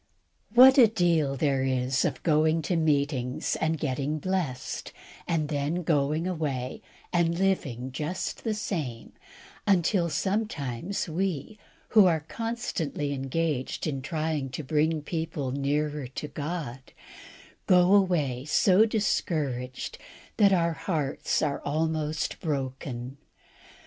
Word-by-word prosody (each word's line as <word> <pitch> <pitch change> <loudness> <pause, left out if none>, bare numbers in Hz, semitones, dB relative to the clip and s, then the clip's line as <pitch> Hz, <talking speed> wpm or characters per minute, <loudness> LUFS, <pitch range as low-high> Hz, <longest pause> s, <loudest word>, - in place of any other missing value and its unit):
What 260 +2 +9
a 235 - +9
deal 170 -9 +1
there 135 -1 +1
is 130 +1 +1
of 130 -7 -2
going 155 +1 +3
to 175 - 0
meetings 140 -5 0
and 160 0 0
getting 145 +1 -2
blessed, 170 -7 -3 0.4
and 160 -3 0
then 150 +4 -1
going 155 +1 +1
away 145 -8 -3 0.3
and 170 -1 +2
living 135 -10 -1
just 155 +7 -4
the 220 -2 -1
same, 150 - -4 0.6
until 180 -2 +3
sometimes 175 - -2
we, 180 +3 -3 0.3
who 210 -4 +7
are 160 -3 +2
constantly 180 - -3
engaged 135 0 -2
in 140 -4 -2
trying 155 -1 -2
to 130 +5 -5
bring 155 +2 +1
people 160 -5 -3
nearer 145 +1 -1
to 135 +4 -6
God, 145 -3 -4 0.9
go 180 +1 +5
away 160 -11 +2
so 190 +7 +4
discouraged 145 - -2 0.4
that 205 -3 +5
our 170 -3 +2
hearts 155 -5 -1
are 145 -2 -1
almost 155 +1 -1
broken. 135 -3 -4
155 Hz, 115 wpm, -27 LUFS, 140-175 Hz, 0.9 s, What